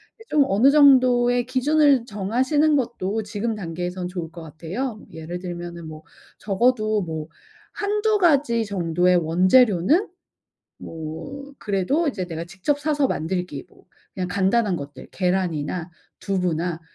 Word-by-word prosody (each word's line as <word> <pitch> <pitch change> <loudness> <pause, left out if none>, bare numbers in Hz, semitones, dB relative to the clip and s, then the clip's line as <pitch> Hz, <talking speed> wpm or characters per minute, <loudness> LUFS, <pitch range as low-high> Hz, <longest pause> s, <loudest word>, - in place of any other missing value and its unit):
이제 450 - -16
좀 290 -2 +4
어느 220 +8 +4
정도의 250 -4 +5
기준을 275 0 +3
정하시는 255 +9 +1
것도 225 -4 -2
지금 215 +2 -3
단계에선 180 0 -4
좋을 170 -3 -6
것 170 -1 -10
같아요. 190 - -5
예를 165 +2 -6
들면은 175 -2 -7
뭐 155 0 -10 0.4
적어도 215 0 +1
뭐 160 -3 -5 0.5
1-2 420 +1 0
가지 275 - +3
정도의 180 -2 +1
원재료는 185 - +3 0.7
뭐 165 - -8
그래도 215 - 0
이제 190 -9 -3
내가 165 -1 -5
직접 195 +11 -2
사서 290 -2 +1
만들기, 170 -3 -3
뭐 - - -23 0.3
그냥 185 -1 -3
간단한 195 +1 +1
것들, 140 -3 -9
계란이나 180 -2 -1 0.3
두부나 175 -3 -1
195 Hz, 275 characters per minute, -23 LUFS, 175-255 Hz, 0.7 s, 정도의